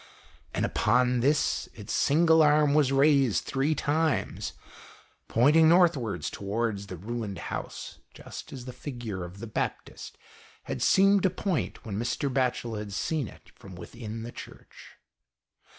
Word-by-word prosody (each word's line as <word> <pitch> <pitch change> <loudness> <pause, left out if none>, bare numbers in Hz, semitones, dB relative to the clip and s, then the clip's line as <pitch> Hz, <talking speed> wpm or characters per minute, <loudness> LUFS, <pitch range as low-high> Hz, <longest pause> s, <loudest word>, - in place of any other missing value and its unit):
And - - +1
upon 125 0 +2
this, 140 +5 +1
its - - -6
single 160 +2 +4
arm 150 -1 +4
was 145 -3 +3
raised 135 - +3
three 140 +3 0
times, 155 +1 -1 0.7
pointing 150 +7 +5
northwards 130 - +2
towards 100 0 -3
the 90 - -7
ruined 105 0 -5 0.2
house, - - -6 0.2
just - - -10
as 130 -3 -8
the 125 - -7
figure 120 -10 -6
of 90 +2 -9
the 110 - -7
Baptist 110 - -5 0.5
had - - -5
seemed 195 +1 +5
to 190 - +3
point 185 -2 -3
when 105 -2 -4
Mr. 130 +3 -2
Batchel 125 -4 -1
had 105 -1 -7
seen 145 +5 -1
it - - -15
from 95 -2 -12
within 110 +5 -8
the 120 - -7
Church. - - -13
125 Hz, 140 wpm, -28 LUFS, 110-150 Hz, 0.7 s, pointing